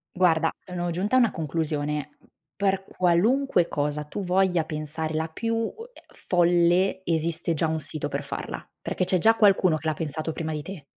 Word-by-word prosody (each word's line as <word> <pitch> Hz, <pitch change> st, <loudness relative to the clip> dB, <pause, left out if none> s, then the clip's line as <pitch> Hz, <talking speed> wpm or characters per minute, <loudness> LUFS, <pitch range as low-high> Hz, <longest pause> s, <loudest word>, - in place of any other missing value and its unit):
Guarda, 165 Hz, -3 st, +3 dB
sono 175 Hz, -1 st, -4 dB
giunta 195 Hz, +8 st, 0 dB
a -, -, +7 dB
una 235 Hz, -4 st, +4 dB
conclusione. 150 Hz, -2 st, -2 dB, 0.5 s
Per 195 Hz, -1 st, 0 dB
qualunque 185 Hz, +4 st, +2 dB
cosa 150 Hz, +1 st, -1 dB
tu 150 Hz, +7 st, -6 dB
voglia 180 Hz, -2 st, +2 dB
pensare 155 Hz, +1 st, -4 dB
la 160 Hz, +1 st, -1 dB
più 230 Hz, +7 st, -2 dB
u 225 Hz, 0 st, -1 dB, 0.2 s
ehm, -, -, -17 dB
folle, 175 Hz, +2 st, +2 dB
esiste 165 Hz, 0 st, 0 dB
già 160 Hz, +1 st, +1 dB
un 160 Hz, 0 st, -1 dB
sito 150 Hz, +1 st, -4 dB
per -, -, -3 dB
farla. -, -, -5 dB, 0.2 s
Perché 185 Hz, -, -1 dB
c'è 185 Hz, 0 st, +2 dB
già 225 Hz, +6 st, +5 dB
qualcuno 195 Hz, -6 st, +4 dB
che 160 Hz, +1 st, -6 dB
l'ha 155 Hz, -, +2 dB
pensato 155 Hz, +1 st, -3 dB
prima 160 Hz, -1 st, -4 dB
di 150 Hz, -1 st, -3 dB
te. 175 Hz, -4 st, -9 dB
170 Hz, 180 wpm, -25 LUFS, 155-190 Hz, 0.5 s, a